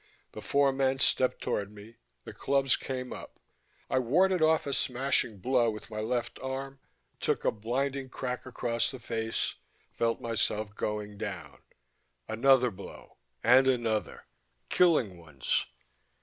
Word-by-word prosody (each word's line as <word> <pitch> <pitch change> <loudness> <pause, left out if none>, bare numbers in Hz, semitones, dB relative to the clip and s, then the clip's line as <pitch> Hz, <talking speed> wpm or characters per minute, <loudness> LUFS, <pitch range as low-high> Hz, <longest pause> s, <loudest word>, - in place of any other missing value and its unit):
The - - -8
four 140 -1 +2
men 135 0 +1
stepped 130 -1 +3
toward 100 0 -2
me, 105 +2 -13 0.3
the - - -9
clubs 135 -1 +2
came 130 -1 -5
up. - - -10 0.5
I 130 - +1
warded 180 +9 +3
off 160 0 +4
a 140 - -2
smashing 125 -5 0
blow 120 +3 +2
with 105 0 -7
my 110 - -4
left 120 +2 -2
arm, 135 +1 -5 0.4
took - - 0
a - - +4
blinding 130 +5 -2
crack 125 0 -4
across 120 -2 -1
the 130 - -7
face, 115 -1 -2 0.4
felt 115 0 0
myself 110 -3 -1
going 105 -1 -4
down 100 -4 -6 0.7
another 125 +2 +4
blow, 100 0 -12 0.3
and 130 +3 +6
another: 115 -4 0 0.4
killing 130 - +3
ones.... 75 -6 -1
125 Hz, 135 wpm, -30 LUFS, 110-135 Hz, 0.7 s, and